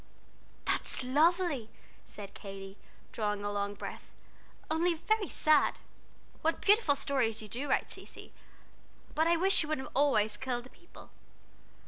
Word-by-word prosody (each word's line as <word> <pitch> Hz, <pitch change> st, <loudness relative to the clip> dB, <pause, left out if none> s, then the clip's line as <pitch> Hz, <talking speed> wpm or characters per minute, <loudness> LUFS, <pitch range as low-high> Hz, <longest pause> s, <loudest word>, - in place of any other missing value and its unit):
"That's -, -, 0 dB
lovely," 300 Hz, -2 st, +2 dB, 0.4 s
said 200 Hz, -2 st, -9 dB
Katy, 195 Hz, -1 st, -9 dB, 0.4 s
drawing 210 Hz, -2 st, -2 dB
a 205 Hz, -, -1 dB
long 205 Hz, 0 st, -2 dB
breath, -, -, -8 dB, 0.6 s
"only 335 Hz, +2 st, +2 dB
very 425 Hz, +5 st, 0 dB
sad! 305 Hz, -1 st, +3 dB, 0.6 s
What 325 Hz, +1 st, +1 dB
beautiful 410 Hz, -8 st, +4 dB
stories 250 Hz, -6 st, 0 dB
you 215 Hz, -, -8 dB
do 260 Hz, +7 st, -4 dB
write, -, -, +1 dB
Cecy! -, -, -12 dB, 0.8 s
But 320 Hz, +2 st, +2 dB
I 340 Hz, 0 st, +4 dB
wish 380 Hz, +3 st, +3 dB
you 305 Hz, -, -3 dB
wouldn't 285 Hz, -4 st, -3 dB
always 220 Hz, -7 st, +3 dB
kill 245 Hz, 0 st, -3 dB
the 255 Hz, -, -15 dB
people. 345 Hz, -, -16 dB
275 Hz, 135 wpm, -32 LUFS, 215-330 Hz, 0.8 s, beautiful